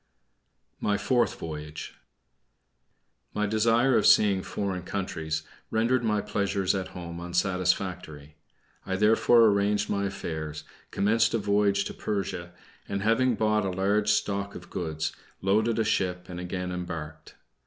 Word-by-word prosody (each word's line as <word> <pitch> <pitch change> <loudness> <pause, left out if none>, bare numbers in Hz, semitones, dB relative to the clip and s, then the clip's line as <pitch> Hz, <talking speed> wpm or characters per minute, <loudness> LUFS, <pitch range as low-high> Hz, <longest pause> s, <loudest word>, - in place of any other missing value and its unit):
MY 105 -1 +1
FOURTH 120 +3 +1
VOYAGE 75 -1 -7 1.4
My 105 - +1
desire 115 +4 +3
of 105 - +4
seeing 100 -3 +5
foreign 95 -1 -3
countries 80 -5 -3 0.3
rendered 120 +3 +1
my 105 -2 +1
pleasures 100 -2 0
at 95 -2 -2
home 85 -1 -6
unsatisfactory. 90 -4 -1 0.5
I 95 - -2
therefore 115 +3 +5
arranged 105 0 +2
my 100 0 0
affairs, 80 -6 -5 0.3
commenced 110 +2 +2
a - - +3
voyage 100 -1 +2
to - - -5
Persia, 95 -4 -3 0.4
and 100 0 -2
having 115 +3 +3
bought 105 0 +2
a 95 - -1
large 100 +3 +1
stock 100 -1 0
of - - -11
goods 80 -3 -3 0.3
loaded 110 +4 +2
a 115 - +2
ship 90 -4 0
and 90 -1 -6
again 90 0 -4
embarked. 85 -4 -6
100 Hz, 130 wpm, -27 LUFS, 90-105 Hz, 1.4 s, seeing